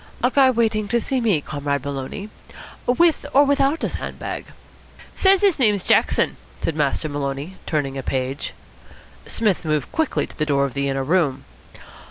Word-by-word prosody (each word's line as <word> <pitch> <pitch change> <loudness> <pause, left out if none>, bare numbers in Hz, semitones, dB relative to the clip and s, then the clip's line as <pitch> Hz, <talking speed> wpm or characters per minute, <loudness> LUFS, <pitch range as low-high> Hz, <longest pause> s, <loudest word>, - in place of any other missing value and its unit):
"A 250 - +3
guy 270 -1 +5
waiting 220 -4 +1
to 235 +3 +1
see 255 +3 -1
me, 205 -10 +2
Comrade 145 -2 -3
Maloney? 140 +9 -5 0.6
With 320 +6 +3
or 285 - +8
without 285 +2 +2
a - - +1
sand - - -5
bag?" - - -5 0.7
"Says 385 0 +4
his 385 -7 +3
name's 210 -6 +3
Jackson," - - +2 0.2
said 165 - -2
Master 150 +1 0
Maloney, 145 +4 -4
turning 140 -3 -1
a - - -2
page. 130 +2 -3 0.7
Psmith 210 -6 0
moved 155 -3 -1
quickly 320 -3 0
to - - -15
the 155 - -1
door 140 -2 +2
of 135 - -5
the 140 0 -1
inner 135 0 -1
room. 145 -4 +1
165 Hz, 170 wpm, -22 LUFS, -, 0.7 s, or